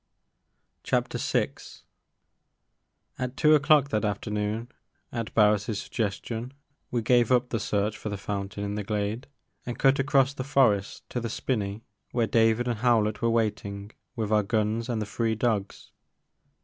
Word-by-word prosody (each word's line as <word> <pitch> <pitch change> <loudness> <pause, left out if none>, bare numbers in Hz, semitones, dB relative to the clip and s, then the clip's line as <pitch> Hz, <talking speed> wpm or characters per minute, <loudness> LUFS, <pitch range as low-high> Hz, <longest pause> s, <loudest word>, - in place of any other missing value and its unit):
'' - - -20
VI. - - +1 1.7
AT 125 +1 -3
two 155 0 +5
o'clock 145 -1 +5
that 110 -3 0
afternoon, 105 +2 -2 0.4
at 115 -2 -4
Bams' 105 -1 +3
suggestion, 115 +4 -3 0.4
we 120 -2 -1
gave 120 0 +3
up 125 0 +3
the 115 - -1
search 105 +1 0
for 110 - -4
the 100 - -3
fountain 100 0 -4
in 100 0 -3
the 105 0 -3
glade 105 +4 -2 0.4
and 120 - -5
cut 135 +1 +4
across 135 -1 +3
the 130 - -4
forest 125 -8 +1
to 125 - -1
the 115 -1 -3
spinney 105 -3 -2 0.3
where 120 -2 +2
David 115 +2 +2
and 120 -3 -1
Hiow 120 -3 +4
lett 105 0 -3
were 115 - +2
waiting 105 -3 -1 0.2
with 110 -3 -2
our 105 -1 +4
guns 110 +3 -1
and 115 -2 -1
the 105 - -2
three 110 +2 -1
dogs. 110 -3 -2
110 Hz, 155 wpm, -27 LUFS, 105-120 Hz, 1.7 s, two